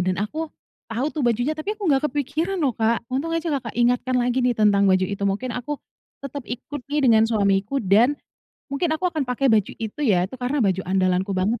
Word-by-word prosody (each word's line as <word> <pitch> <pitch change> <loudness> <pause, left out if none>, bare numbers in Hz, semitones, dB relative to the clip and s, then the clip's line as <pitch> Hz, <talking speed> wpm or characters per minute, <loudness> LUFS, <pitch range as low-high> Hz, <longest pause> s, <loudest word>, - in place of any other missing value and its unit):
dan 185 - +1
aku 305 +10 -3 0.4
tahu 240 +6 -1
tuh 305 - -2
bajunya. 245 +5 +1
Tapi 310 +6 -4
aku 415 - -12
nggak 275 -3 +3
kepikiran 295 +7 -2
loh 270 -6 +1
Kak, 225 +1 +1
untung 300 +6 -1
aja 330 0 -1
Kakak 235 -4 -6
ingatkan 250 +1 +2
lagi 245 +1 +1
nih 250 - +3
tentang 205 -2 +4
baju 185 0 +3
itu. 200 0 -5
Mungkin 200 +6 -1
aku, 285 +4 -4 0.4
tetap 275 -1 -6
ikut 260 +4 -6
nih 300 - +2
dengan 220 -1 +6
suamiku 205 +3 +1
dan, 220 +7 +4 0.6
mungkin 305 +5 0
aku 365 - -7
akan 310 -3 -1
pakai 260 +2 0
baju 210 -3 +2
itu 225 +5 -6
ya, 185 -8 +3
itu 190 - -7
karena 255 +4 -1
baju 190 -1 +1
andalanku 185 +1 +1
banget 210 +5 0
245 Hz, 205 wpm, -23 LUFS, 205-285 Hz, 0.6 s, dengan